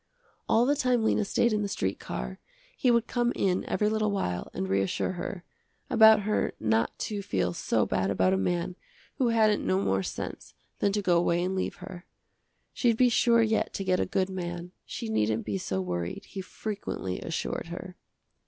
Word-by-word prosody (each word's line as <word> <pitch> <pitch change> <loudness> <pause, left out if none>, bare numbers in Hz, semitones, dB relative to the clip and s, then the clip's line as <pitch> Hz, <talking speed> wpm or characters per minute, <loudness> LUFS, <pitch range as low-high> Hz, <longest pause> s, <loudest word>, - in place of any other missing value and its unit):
All 230 +2 +4
the 285 +3 +3
time 250 -5 +2
Lena 220 - +2
stayed 230 +3 +2
in 210 - +1
the 205 - -1
street 95 - -2
car, 60 0 -5 0.4
he 255 - +2
would 235 -1 +4
come 240 0 0
in 185 -2 +1
every 210 - +1
little 215 0 +1
while 90 - -2
and 95 - -3
reassure 95 - 0
her, 180 0 -5 0.5
about 220 -2 +7
her 210 +1 0
not 110 +1 +1
to 205 -2 -3
feel 95 - -1
so - - +1
bad 95 +1 0
about 95 -1 +2
a - - +2
man 175 - -1 0.4
who 255 - +3
hadn't 220 -2 +3
no 95 0 +1
more 95 0 +1
sense - - -6 0.2
than 200 - +2
to 205 0 0
go 175 -2 +4
away 170 0 +1
and 185 +1 -1
leave 185 - -2
her. 180 -1 -10 0.7
She'd 235 -3 +2
be 250 0 +5
sure 235 0 +4
yet 220 0 0
to 195 - -3
get 185 -1 +1
a - - 0
good 190 0 0
man, 175 -1 -5 0.2
she 235 - -5
needn't 110 - 0
be 100 -3 -2
so 95 0 -2
worried, 90 -1 -4
he 195 - -6
frequently 195 - -5
assured - - -3
her. - - -7
185 Hz, 190 wpm, -28 LUFS, -, 0.7 s, about